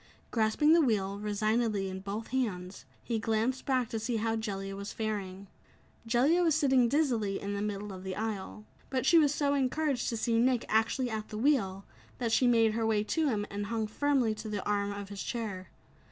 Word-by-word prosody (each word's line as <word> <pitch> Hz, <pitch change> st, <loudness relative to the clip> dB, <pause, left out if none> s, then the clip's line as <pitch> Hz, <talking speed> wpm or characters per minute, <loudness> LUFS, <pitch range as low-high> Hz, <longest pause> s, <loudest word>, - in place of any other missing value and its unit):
Grasping 230 Hz, +7 st, +3 dB
the 335 Hz, -, +6 dB
wheel 200 Hz, -7 st, 0 dB
resignedly 210 Hz, 0 st, 0 dB
in 190 Hz, 0 st, -5 dB
both 200 Hz, +3 st, -5 dB
hands, 195 Hz, -8 st, -3 dB, 0.2 s
he 230 Hz, -2 st, -1 dB
glanced 225 Hz, +5 st, -1 dB
back 255 Hz, -3 st, +2 dB
to 225 Hz, -, -3 dB
see 230 Hz, +2 st, -2 dB
how 225 Hz, 0 st, 0 dB
Jellia 195 Hz, -3 st, -4 dB
was 200 Hz, +1 st, -6 dB
faring. 200 Hz, -3 st, -4 dB, 0.6 s
Jellia 270 Hz, +9 st, +3 dB
was 325 Hz, -4 st, +3 dB
sitting 265 Hz, -6 st, +3 dB
dizzily 235 Hz, -9 st, +1 dB
in 200 Hz, 0 st, -4 dB
the 200 Hz, -, -2 dB
middle 205 Hz, -1 st, -4 dB
of 185 Hz, 0 st, -9 dB
the 190 Hz, -1 st, -4 dB
aisle. 215 Hz, -1 st, -4 dB, 0.2 s
But 260 Hz, -1 st, -1 dB
she 335 Hz, +4 st, +6 dB
was 295 Hz, -3 st, +4 dB
so 285 Hz, -1 st, +1 dB
encouraged 275 Hz, -1 st, 0 dB
to 230 Hz, -, -2 dB
see 230 Hz, 0 st, +1 dB
Nick 250 Hz, 0 st, +2 dB
actually 225 Hz, +3 st, +1 dB
at 215 Hz, -1 st, -4 dB
the 215 Hz, -, -6 dB
wheel, 215 Hz, -7 st, +1 dB, 0.3 s
that 235 Hz, -2 st, -1 dB
she 250 Hz, -, +4 dB
made 230 Hz, -2 st, +4 dB
her 225 Hz, +1 st, -1 dB
way 220 Hz, -2 st, +2 dB
to 315 Hz, +8 st, 0 dB
him 210 Hz, -4 st, -1 dB
and 205 Hz, +1 st, -3 dB
hung 225 Hz, 0 st, -1 dB
firmly 255 Hz, 0 st, +1 dB
to 215 Hz, +1 st, -7 dB
the 205 Hz, -2 st, -3 dB
arm 205 Hz, -1 st, 0 dB
of 200 Hz, -1 st, -6 dB
his 200 Hz, -1 st, -6 dB
chair. 210 Hz, -6 st, -4 dB
220 Hz, 200 wpm, -30 LUFS, 205-255 Hz, 0.6 s, the